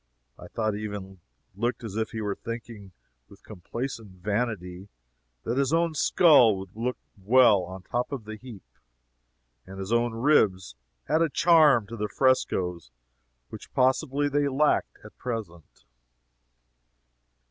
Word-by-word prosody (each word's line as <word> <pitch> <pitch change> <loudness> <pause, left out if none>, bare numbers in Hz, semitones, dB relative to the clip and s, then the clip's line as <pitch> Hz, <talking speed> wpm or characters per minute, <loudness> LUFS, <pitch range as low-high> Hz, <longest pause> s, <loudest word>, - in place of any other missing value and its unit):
I - - -10
thought 110 -2 -2
he 105 +1 -5
even 95 -3 -7 0.4
looked 120 +3 -2
as 105 -3 -7
if 110 0 -1
he 110 - -5
were 105 -1 -2
thinking, 115 -3 -8 0.4
with 100 - -18
complacent 110 +2 -7
vanity, 100 -1 -3 0.5
that 120 +4 -1
his 140 0 +1
own 165 0 +1
skull 145 - +5
would 95 0 -10
look 125 +3 -3 0.2
well 110 0 +5
on 95 +1 -9
top 125 +6 -3
of 135 -5 -5
the 110 0 -7
heap 110 -4 -12 1.0
and 95 +1 -10
his 95 +3 -4
own 120 -1 +1
ribs 110 - +2 0.3
add 155 +2 +2
a 165 - +2
charm 150 -8 +4
to 115 +3 -8
the 105 0 -3
frescoes 90 - 0 0.6
which - - -11
possibly 130 +2 +1
they 145 0 +1
lacked 140 +2 +1
at - - -14
present. 105 -10 -7
115 Hz, 140 wpm, -26 LUFS, 100-130 Hz, 1.0 s, skull